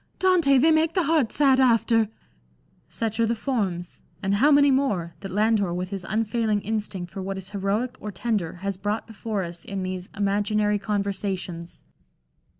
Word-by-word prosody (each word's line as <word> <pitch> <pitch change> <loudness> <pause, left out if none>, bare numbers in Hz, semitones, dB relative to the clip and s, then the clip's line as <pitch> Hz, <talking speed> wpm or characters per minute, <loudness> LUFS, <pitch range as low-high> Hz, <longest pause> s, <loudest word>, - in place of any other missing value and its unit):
Dante! 345 -7 +4
they 315 +5 +5
make 315 +1 +2
the 365 - +3
heart 300 -7 +2
sad 270 -3 +4
after" 230 -3 +3 0.4
— 60 - -38 0.3
such 225 -1 -3
are 230 - +3
the 230 - 0
forms 195 -9 -3
— - - -31
and 195 +1 +1
how 270 +9 +4
many 285 -1 +6
more 205 -12 0
I - - -32
— - - -32
that 195 -2 -7
Landor 210 -1 +2
with 180 +1 -3
his 195 -2 -5
unfail 220 +1 0
ing 205 -1 +2
instinct 205 -4 -4
for 195 - -6
what 195 +1 -4
is 190 0 -8
heroic 205 +5 -2
or 210 - -6
tender 200 -3 -2
has 195 +1 -4
brought 205 +3 -2
before 215 -2 -4
us 170 -1 -7
in 195 -2 -4
these 185 0 -4
hnaginary 205 +1 0
Conversations. 195 -4 -3
210 Hz, 190 wpm, -25 LUFS, 190-235 Hz, 0.4 s, many